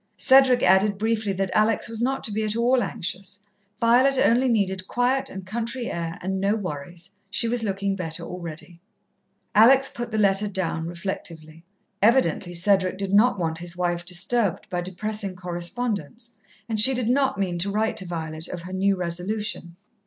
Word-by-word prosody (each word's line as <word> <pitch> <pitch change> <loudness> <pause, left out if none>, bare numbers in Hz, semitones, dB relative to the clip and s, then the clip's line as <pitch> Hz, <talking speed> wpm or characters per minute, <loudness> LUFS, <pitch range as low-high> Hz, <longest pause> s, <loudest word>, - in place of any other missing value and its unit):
Cedric 260 -2 +5
added 195 +2 +4
briefly 220 -1 0
that 190 0 -2
Alex 215 +1 +2
was 230 -1 -5
not 265 +2 -1
to 220 - 0
be 215 +1 -1
at 215 0 -1
all 245 +2 +2
anxious. 195 +1 -4 0.4
Violet 255 +4 +4
only 255 +1 +3
needed 190 -4 0
quiet 260 +2 0
and 190 -1 -8
country 235 +4 -3
air, 165 -1 -4
and 190 +1 -2
no 200 +2 +2
worries. 175 -1 -7 0.2
She 230 - 0
was 240 +1 0
looking 195 -2 -1
better 170 -2 -5
already. 170 0 -9 0.7
Alex 265 +5 +6
put 240 0 -5
the 220 - -3
letter 200 0 +3
down 180 -4 -2
reflectively. 165 -2 -6 0.4
Evidently 195 -6 +2
Cedric 185 +1 +2
did 195 0 -3
not 210 +1 +4
want 165 -2 -2
his 175 0 -6
wife 175 -1 -1
disturbed 190 +3 0
by 180 -1 -1
depressing 195 +2 -3
correspondence, 215 +6 -4 0.3
and 220 -2 -1
she 260 +5 +7
did 245 -2 -1
not 265 0 +2
mean 180 -3 -2
to 195 +4 0
write 215 +2 -1
to 190 - 0
Violet 160 -1 -5
of 175 -2 -7
her 185 +1 -8
new 195 +1 +2
resolution. 180 0 -3
200 Hz, 170 wpm, -24 LUFS, 175-230 Hz, 0.7 s, she